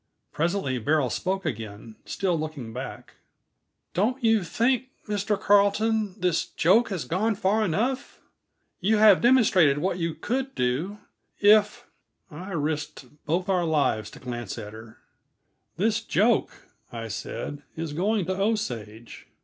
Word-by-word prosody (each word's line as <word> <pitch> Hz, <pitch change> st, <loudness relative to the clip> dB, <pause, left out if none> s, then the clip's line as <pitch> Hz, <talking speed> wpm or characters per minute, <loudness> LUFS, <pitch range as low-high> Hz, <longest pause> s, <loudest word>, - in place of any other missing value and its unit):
Presently 165 Hz, -6 st, -1 dB
Beryl 145 Hz, +1 st, +1 dB
spoke 190 Hz, 0 st, -2 dB
again, 110 Hz, -5 st, -6 dB
still 185 Hz, -3 st, -1 dB
looking 155 Hz, -8 st, -5 dB
back. 130 Hz, +1 st, -8 dB, 0.8 s
"Don't 245 Hz, +8 st, 0 dB
you 225 Hz, -3 st, +3 dB
think, 235 Hz, +8 st, +1 dB, 0.2 s
Mr. 205 Hz, 0 st, -1 dB
Carleton, 205 Hz, 0 st, +2 dB
this 180 Hz, -2 st, +1 dB
joke 225 Hz, +8 st, +3 dB
has 180 Hz, -9 st, -3 dB
gone 205 Hz, -, 0 dB
far 210 Hz, +2 st, +1 dB
enough? 225 Hz, +8 st, -1 dB, 0.6 s
You 215 Hz, +4 st, +2 dB
have 210 Hz, -3 st, +6 dB
demonstrated 200 Hz, -, +5 dB
what 180 Hz, +3 st, -1 dB
you 165 Hz, -1 st, -2 dB
could 265 Hz, +3 st, -3 dB
do, 135 Hz, +12 st, -1 dB, 0.4 s
if 210 Hz, +3 st, +4 dB, 0.2 s
" -, -, -49 dB
I 175 Hz, +6 st, -8 dB
risked 150 Hz, -2 st, -3 dB, 0.2 s
both 175 Hz, +4 st, 0 dB
our 185 Hz, -3 st, +2 dB
lives 150 Hz, -9 st, +1 dB
to -, -, -12 dB
glance 120 Hz, -4 st, -6 dB
at 105 Hz, 0 st, -7 dB
her. 110 Hz, 0 st, -12 dB, 0.8 s
"This 220 Hz, +4 st, +1 dB
joke," 225 Hz, +1 st, +2 dB, 0.4 s
I 115 Hz, -1 st, -6 dB
said, 140 Hz, +6 st, -5 dB
"is 160 Hz, -2 st, -4 dB
going 195 Hz, +4 st, 0 dB
to 185 Hz, +2 st, -2 dB
Osage. 120 Hz, -, -3 dB
180 Hz, 135 wpm, -26 LUFS, 145-215 Hz, 0.8 s, have